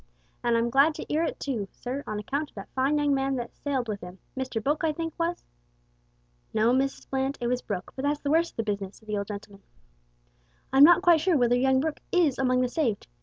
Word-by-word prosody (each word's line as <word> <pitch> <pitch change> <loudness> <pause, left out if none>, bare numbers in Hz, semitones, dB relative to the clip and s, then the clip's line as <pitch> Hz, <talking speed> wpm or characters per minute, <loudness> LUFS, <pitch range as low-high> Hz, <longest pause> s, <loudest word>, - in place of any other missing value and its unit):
An' 240 -1 +2
I'm 230 +1 +1
glad 280 +4 +4
to 315 - -6
'ear 310 - +2
it - - -4
too, 235 -8 -3
sir, 260 +3 -5
on 215 - -3
account 280 +8 -3
o' - - -27
that 195 - -9
fine 270 +3 +2
young 290 -1 +2
man 270 0 0
that 240 -2 -5
sailed 270 -4 -2
with 205 -2 -4
'im 180 +1 -9 0.2
Mr 260 -3 -3
Book, 290 +8 -1
I 320 - +3
think, 325 +1 -4
was 335 +1 -2 0.5
" - - -40
"No, 225 +3 +4
Mrs 270 +1 -1
Bland, 270 +1 -1
it 240 - -3
was 250 +1 0
Brooke; 190 -4 -5
but 265 - -4
that's 290 +1 0
the 285 - -1
worst 330 +2 +2
of - - -41
the 225 - 0
business," 200 -2 -3
said 220 - -21
the 210 -1 -1
old 200 - -4
gentleman; 200 -1 -8 1.1
"I'm 270 +1 +8
not 345 +3 +7
quite 340 -4 +5
sure 350 -1 +3
whether 245 -1 +3
young 260 +1 +3
Brooke 315 +1 -2
is 325 -8 +2
among 255 -1 +2
the 250 - +2
saved. 245 -6 -1
260 Hz, 240 wpm, -27 LUFS, 220-290 Hz, 1.1 s, I'm